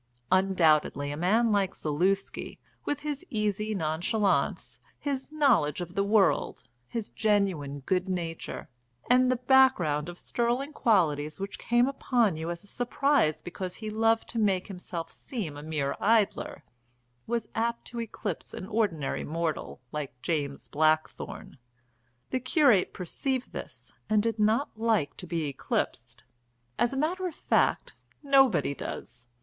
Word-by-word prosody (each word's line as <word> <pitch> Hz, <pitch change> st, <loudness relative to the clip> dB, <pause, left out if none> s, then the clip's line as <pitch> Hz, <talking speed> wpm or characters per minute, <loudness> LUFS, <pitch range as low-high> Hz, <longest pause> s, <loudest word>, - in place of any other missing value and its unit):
Undoubtedly 165 Hz, -6 st, +3 dB
a -, -, -3 dB
man 215 Hz, +8 st, +2 dB
like 200 Hz, -2 st, +1 dB
Zaluski, 180 Hz, +6 st, -1 dB, 0.3 s
with 290 Hz, -1 st, -2 dB
his 295 Hz, 0 st, -4 dB
easy 215 Hz, -2 st, -1 dB
nonchalance, 180 Hz, +5 st, 0 dB, 0.2 s
his 275 Hz, -1 st, -3 dB
knowledge 245 Hz, -, +3 dB
of 175 Hz, 0 st, -5 dB
the 200 Hz, -, +1 dB
world, 200 Hz, -1 st, +2 dB, 0.2 s
his 225 Hz, -, -4 dB
genuine 190 Hz, -10 st, 0 dB
good 185 Hz, +6 st, 0 dB
nature, 170 Hz, -3 st, -4 dB, 0.4 s
and 255 Hz, 0 st, +5 dB
the -, -, +3 dB
background 245 Hz, -, +4 dB
of 175 Hz, -, -8 dB
sterling 245 Hz, +8 st, -1 dB
qualities 155 Hz, -, +2 dB
which 195 Hz, +1 st, -5 dB
came 240 Hz, +1 st, +3 dB
upon 245 Hz, -8 st, +1 dB
you 160 Hz, +2 st, -4 dB
as 170 Hz, +1 st, -5 dB
a -, -, -15 dB
surprise 245 Hz, -, +1 dB
because 180 Hz, +1 st, -5 dB
he 215 Hz, -1 st, -6 dB
loved 225 Hz, +1 st, +2 dB
to 235 Hz, -, -3 dB
make 195 Hz, -4 st, +2 dB
himself 180 Hz, -3 st, -6 dB
seem 210 Hz, -, -5 dB
a 145 Hz, -, -7 dB
mere 150 Hz, -3 st, -2 dB
idler, 220 Hz, -1 st, +1 dB, 0.6 s
was 235 Hz, -2 st, -1 dB
apt 235 Hz, +1 st, -1 dB
to 235 Hz, -1 st, -4 dB
eclipse 215 Hz, -5 st, -5 dB
an -, -, -6 dB
ordinary 195 Hz, -9 st, -1 dB
mortal 160 Hz, -4 st, -3 dB
like 140 Hz, -4 st, -5 dB
James 145 Hz, -4 st, -2 dB
Blackthorne. 155 Hz, -2 st, -1 dB, 0.7 s
The 260 Hz, -, +1 dB
curate 255 Hz, -, +4 dB
perceived 255 Hz, +8 st, -3 dB
this -, -, -8 dB, 0.2 s
and 215 Hz, -1 st, +3 dB
did 225 Hz, -1 st, -1 dB
not 220 Hz, +7 st, +2 dB
like 220 Hz, -9 st, +1 dB
to 180 Hz, -, -7 dB
be 165 Hz, -1 st, -1 dB
eclipsed 140 Hz, -2 st, -3 dB, 0.6 s
as 240 Hz, -, +3 dB
a 270 Hz, -, -3 dB
matter 360 Hz, +6 st, 0 dB
of 335 Hz, -, -7 dB
fact, -, -, +1 dB, 0.3 s
nobody 270 Hz, -, +4 dB
does. 120 Hz, -3 st, -7 dB
200 Hz, 140 wpm, -28 LUFS, 160-235 Hz, 0.7 s, and